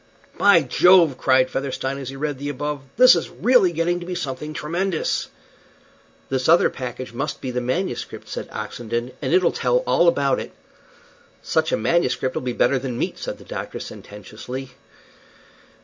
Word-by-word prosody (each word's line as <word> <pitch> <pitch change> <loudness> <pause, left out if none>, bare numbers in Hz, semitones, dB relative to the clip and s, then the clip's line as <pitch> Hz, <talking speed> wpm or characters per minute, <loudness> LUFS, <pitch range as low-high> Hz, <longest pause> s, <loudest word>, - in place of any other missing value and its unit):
"By 190 -6 +5
Jove!" 170 +2 +5
cried 130 -1 +3
Featherstone, 135 0 -3
as 135 -2 -6
he 135 - -7
read 145 -1 -3
the 145 +1 -4
above, 145 +1 -3 0.2
"this 250 -5 +8
is 170 - -2
really 225 -4 +3
getting 170 +2 0
to 175 - -8
be 180 - -3
something 140 0 -4
tremendous." 170 +4 -2 1.0
"This 130 +1 -1
other 170 +2 +5
package 125 -1 -6
must 140 +5 -3
be 130 - -4
the 125 0 -2
manuscript," 130 +3 -3
said - - -6
Oxenden, 120 +1 -4
"and - - -2
it'll 180 0 +4
tell - - +1
all 175 - +3
about 140 -5 +2
it." - - -7 0.9
"Such - - 0
a - - +2
manuscript'll 130 -1 0
be 125 - -2
better 130 +2 +2
than 125 -2 -4
meat," - - -3
said - - -5
the - - -14
doctor, - - -6
sententiously. 125 +6 -8
140 Hz, 165 wpm, -22 LUFS, 130-170 Hz, 1.0 s, this